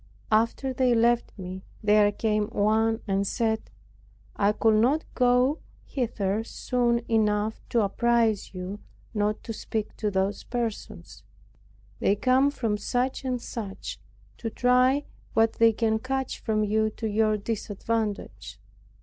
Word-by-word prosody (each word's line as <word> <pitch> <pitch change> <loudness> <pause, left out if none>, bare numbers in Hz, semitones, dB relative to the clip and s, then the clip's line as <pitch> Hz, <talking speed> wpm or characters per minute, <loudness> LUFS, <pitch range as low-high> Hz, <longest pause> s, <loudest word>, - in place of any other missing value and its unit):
After 230 +5 +1
they 250 -2 +3
left 235 +1 +2
me 185 0 -7 0.2
there 210 0 +5
came 210 0 0
one 220 +1 +1
and 195 0 0
said, 220 0 -1 0.7
"I 200 0 +3
could 215 0 +3
not 285 +7 +2
get 250 +3 +3 0.3
hither 220 -5 -1
soon 240 0 0
enough 215 -1 +1
to 235 - +2
apprize 225 0 +1
you 185 +2 -6 0.3
not 210 0 -1
to 225 - -5
speak 220 0 -4
to 210 - 0
those 195 +1 -1
persons; 235 -3 -5 0.8
they 200 - +3
come 255 +5 +3
from 230 -7 -1
such 250 +5 -1
and 255 -2 -1
such, 210 -4 -6 0.4
to 225 - -3
try 250 +4 +3 0.3
what 225 0 +4
they 230 0 +6
can 220 0 0
catch 265 +2 -3
from 215 -2 0
you 215 +1 +1
to 220 +1 -5
your 215 0 +2
disadvantage." 205 - -3
220 Hz, 130 wpm, -26 LUFS, 210-240 Hz, 0.8 s, they